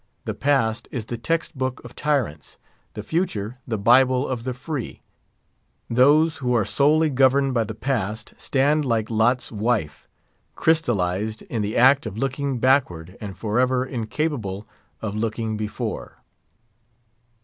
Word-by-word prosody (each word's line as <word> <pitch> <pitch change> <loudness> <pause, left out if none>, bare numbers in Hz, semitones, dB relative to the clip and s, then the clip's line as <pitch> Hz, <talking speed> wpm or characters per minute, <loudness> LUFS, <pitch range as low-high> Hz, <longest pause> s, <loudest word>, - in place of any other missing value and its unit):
The - - -2
Past 135 -6 +1
is 120 -5 -4
the 120 +1 -5
text 165 +7 -1
book 130 -1 -2
of 120 - -10
tyrants; 135 - -2 0.4
the - - -5
Future 125 - -2
the 110 - -1
Bible 125 +5 +4
of 125 -2 -4
the 130 - -2
Free. 130 0 -5 0.9
Those 150 +6 +4
who 125 -3 0
are 110 -4 +2
solely 150 +7 +3
governed 135 +1 +3
by 115 -2 +1
the 110 - -6
Past 110 -3 -3
stand 145 +3 +1
like 115 -4 -1
Lot's 120 +3 +1
wife, 105 -8 -1 0.5
crystallised 110 - 0
in 125 - -3
the 105 +1 -2
act 130 +1 +5
of 105 -1 -7
looking 135 +1 -1
backward, 105 - +1
and 100 -3 -7
forever 125 +4 +1
incapable 115 -4 -3 0.4
of 105 -2 -2
looking 110 0 -2
before. 105 0 -5
125 Hz, 140 wpm, -23 LUFS, 110-135 Hz, 0.9 s, act